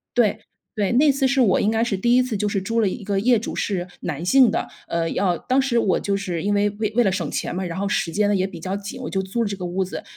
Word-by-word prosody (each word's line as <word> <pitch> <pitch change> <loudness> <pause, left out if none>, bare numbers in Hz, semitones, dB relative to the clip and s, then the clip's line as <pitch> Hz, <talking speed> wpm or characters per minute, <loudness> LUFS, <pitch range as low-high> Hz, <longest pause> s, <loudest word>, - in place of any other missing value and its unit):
对 220 -3 +2 0.4
对， 205 -2 0
那 285 +3 +5
次 270 0 +1
是 270 +1 +1
我 200 -7 +3
应 210 - +2
该 225 +1 +1
是 225 -4 0
第 240 +5 +2
1 255 - +5
次 245 -4 -3
就 210 +1 -1
是 195 -2 -1
租 230 +4 -1
了 205 - +2
一 210 +3 -6
个 200 -1 0
业 240 +2 +4
主 220 - -5
是 185 -3 -2
男 160 0 -4
性 255 +4 +6
的。 - - -2 0.2
呃， 165 -1 -1
要 180 -4 +1
当 265 +1 +1
时 260 -3 0
我 200 -5 +2
就 200 -1 -1
是 180 -4 -3
因 205 +3 0
为 205 0 +2
为 215 0 -3
为 245 - +5
了 190 - +3
省 175 -6 -2
钱 - - -3
嘛， 190 - -2
然 175 +1 -4
后 200 - -1
时 170 -4 -1
间 210 +2 +1
呢 205 - +2
也 185 0 +1
比 175 -4 -9
较 185 +3 -3
紧， 205 +6 -7
我 250 - -5
就 190 - -1
租 210 +5 -2
了 - - -1
这 200 - -3
个 185 - -6
屋 185 +2 -1
子， 185 - -6
205 Hz, 325 characters per minute, -22 LUFS, 190-235 Hz, 0.4 s, 性